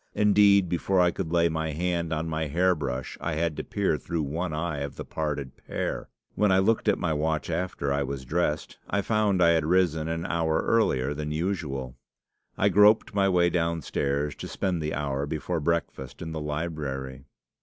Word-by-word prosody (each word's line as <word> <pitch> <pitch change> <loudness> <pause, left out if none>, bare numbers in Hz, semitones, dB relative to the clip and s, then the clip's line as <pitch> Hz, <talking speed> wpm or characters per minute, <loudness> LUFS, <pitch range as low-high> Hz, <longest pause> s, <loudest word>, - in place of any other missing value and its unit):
Indeed, 100 -2 +5
before 90 +2 +1
I 90 -1 +4
could 80 - -4
lay 85 -1 +4
my 80 -1 -2
hand 85 0 -1
on 80 +1 -1
my 80 -1 -2
hair 90 +5 +3
brush 65 -5 -4
I 80 - -2
had 80 0 -1
to - - -3
peer 95 -7 0
through 80 +3 -2
one 80 +5 -3
eye 80 -1 -2
of 70 0 -5
the - - -7
parted 75 -4 -3
pair. - - -4 0.2
When 105 -2 +2
I 95 - +5
looked 110 +4 +2
at - - +4
my 85 -3 0
watch 80 +2 -1
after 80 -5 -1
I 70 - 0
was 70 -1 -4
dressed, 80 +1 -1
I 100 -1 0
found 105 -4 +2
I 85 - +6
had 80 -2 +2
risen 80 -2 +2
an 85 +1 -3
hour 80 -2 0
earlier 70 - +2
than 75 0 -4
usual. 75 -7 -3 0.6
I - - +3
groped 105 +2 +5
my 100 -1 +3
way 90 -2 +3
downstairs 75 -4 -1
to - - -6
spend 90 -4 -2
the 75 -2 -2
hour 70 0 -2
before 80 +3 -2
breakfast 75 -5 -2
in 80 - -5
the 80 -1 -4
library. 75 -4 -4
80 Hz, 190 wpm, -27 LUFS, 75-90 Hz, 0.6 s, I